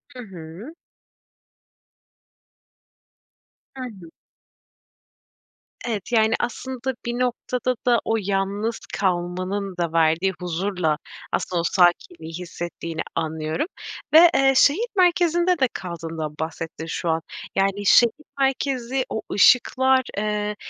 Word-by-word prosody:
Hı 250 - -8
hı. 185 - -10 3.0
Hı 260 - -6
hı. 195 -9 -9 1.8
Evet. 220 -1 -3
Yani, 220 -1 +3
aslında 260 +1 -3
bir 240 +1 -2
noktada 250 0 -1
da 240 -2 +5
o 225 - +1
yalnız 200 +3 -1
kalmanın 185 +1 -2
da 170 -2 -2
verdiği 165 +4 +2
huzurla 180 -3 -1 0.3
aslında 175 -2 -1
o - - -1
sakinliği 175 - +1
hissettiğini 170 -1 -5
anlıyorum 160 - -2 0.5
ve, 335 +2 +9
eee, 270 0 +4
şehir 365 - +4
merkezinde 350 -1 +3
de 260 - +4
kaldığından 165 -3 -5
bahsettin 160 0 -5
şu 165 +1 -3
an. 160 0 +1 0.3
Yani, 195 +1 0
şehir 235 +3 +6 0.3
merkezi 265 -1 0
o 220 - -3
ışıklar, 260 +4 +5 0.2
eee, 210 0 -1
200 Hz, 105 wpm, -23 LUFS, 170-255 Hz, 3.0 s, ve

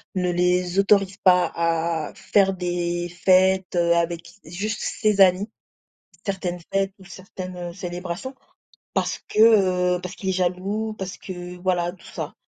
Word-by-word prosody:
ne 180 -1 +1
les 180 +1 +1
autorise 195 -1 +3
pas 180 -1 +5
à 165 -1 -1
faire 195 -2 +2
des 175 -1 -2
fêtes, 185 +1 +3
heu, 170 -1 +3
avec 170 0 -1
juste 205 +7 -4
ses 210 -3 +1
amis, 190 +3 +5 0.8
certaines 190 -3 -3
fêtes 195 0 +1
ou 190 - -15
certaines, 185 -1 -9
heu, 175 -1 -6
célébrations. 180 +7 -6 0.6
Parce - - -1
que, 190 -5 +4
heu, - - -9
parce 180 +1 -7
qu'il 190 - -4
est - - +3
jaloux, 190 +4 -1
parce 190 0 -6
que 180 -1 -8
voilà 175 -2 0
tout 185 - -18
ça. - - -6
180 Hz, 150 wpm, -23 LUFS, 175-195 Hz, 0.8 s, pas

